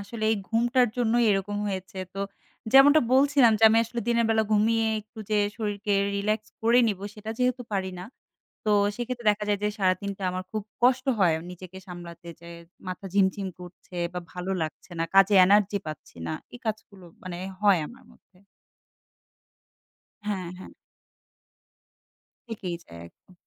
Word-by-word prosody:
আসলে 215 +2 -5
এই 220 - +2
ঘুমটার 240 +2 +3
জন্যই 240 0 +2
এরকম 200 +1 -1
হয়েছে। 190 -1 -5 0.2
তো 195 - -4 0.5
যেমনটা 285 +3 +8
বলছিলাম, 270 -3 +5
যে - - -7
আমি 225 +1 +4
আসলে 235 +1 -5
দিনের 235 -1 +3
বেলা 220 0 +3
ঘুমিয়ে 225 +2 +3
একটু 215 +2 -18
যে 210 - +3 0.2
শরীরকে 210 -1 -2 0.2
রিল্যাক্স 215 +2 -1
করে 230 +2 +5
নিবো, 200 -1 -3
সেটা 215 +1 -7
যেহেতু 250 0 +1
পারি 190 -1 -1
না 180 - -7 0.6
তো 215 - +1 0.3
সেক্ষেত্রে 240 -1 -5
দেখা 210 0 -2
যায় 205 -1 +1
যে 210 - +3
সারাদিনটা 195 +1 -1
আমার 185 0 -4
খুব 215 - -2 0.2
কষ্ট 255 +1 +4
হয় 175 -4 +4 0.2
নিজেকে 185 +1 -10
সামলাতে। 175 -1 -10
যে 170 - -12 0.4
মাথা 185 +2 -6
ঝিমঝিম 195 0 +2
করছে 180 0 -12 0.2
বা 180 - -2
ভালো 180 +1 -5
লাগছে 155 +3 -6
না - - +2
কাজে 195 +1 +6
এনার্জি 205 +1 +3
পাচ্ছি 155 -1 -9
না - - -2 0.2
এই - - -8
কাজগুলো 210 -3 -5 0.2
মানে 185 -2 -6 0.3
হয় 200 -4 +5
আমার 255 +2 -15
মধ্যে। 180 - -26 1.9
হ্যাঁ, 195 -4 -2
হ্যাঁ। 185 - -10 1.8
থেকেই 190 -6 -4
যায় 85 - -12
একদম। 185 - -25
205 Hz, 155 wpm, -26 LUFS, 185-230 Hz, 1.9 s, যেমনটা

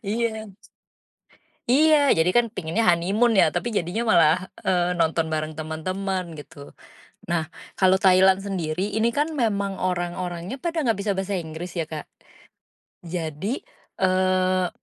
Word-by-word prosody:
Iya. 220 +1 -2 1.2
Iya, 295 0 +5
jadi 160 +2 +3
kan 240 -1 +4
pengennya 190 +2 -2
honeymoon 195 +6 +3
ya, - - +7
tapi 240 - -1
jadinya 200 +2 -1
malah, 160 -1 +5 0.3
eee, 180 -1 +2
nonton 160 0 +1
bareng 155 0 -2
temen-temen, 180 +3 -4
gitu. 145 -1 -12 0.5
Nah, 165 -3 -1 0.2
kalau 190 0 +3
Thailand 190 0 +5
sendiri, 190 -1 -3
ini 225 +2 +2
kan 300 +5 -1
memang 200 -6 0
orang-orangnya 175 +2 -3
pada 335 -1 -1
nggak 230 - +2
bisa 205 - 0
bahasa 195 +1 -2
Inggris 170 +1 -6
ya, 170 - 0
Kak. 155 -2 -6 1.0
Jadi, 170 - -4 0.4
eee, 185 0 +2
185 Hz, 130 wpm, -24 LUFS, 170-210 Hz, 1.2 s, ya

